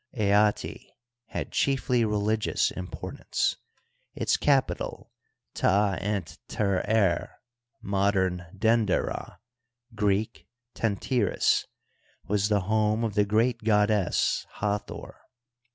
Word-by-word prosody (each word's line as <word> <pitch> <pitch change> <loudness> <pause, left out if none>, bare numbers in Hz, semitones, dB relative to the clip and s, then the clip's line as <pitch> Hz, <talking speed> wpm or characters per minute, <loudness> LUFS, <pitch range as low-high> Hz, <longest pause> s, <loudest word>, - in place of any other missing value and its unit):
Aatz 105 0 +1 0.4
hsid - - -4
chiefly 125 -3 +1
religious 105 0 +1
importance; 90 0 -3 0.6
its - - +1
capital, 140 -3 0 0.4
Ta 100 +1 +2
ent 100 -5 -3
terer 100 -1 +1 0.5
(modem 95 -2 +1
Vender 110 0 +1
ah, - - -8 0.6
Greek 105 +1 -1 0.3
Tentyris), 115 +1 +1 0.6
was 105 +1 +1
the 105 -2 +2
home 110 +3 +1
of 110 -2 -1
the 105 0 +3
great 115 +3 +1
goddess 105 -3 +2
Ha 105 0 -1
thor. 105 - -10
105 Hz, 90 wpm, -27 LUFS, 100-110 Hz, 0.6 s, the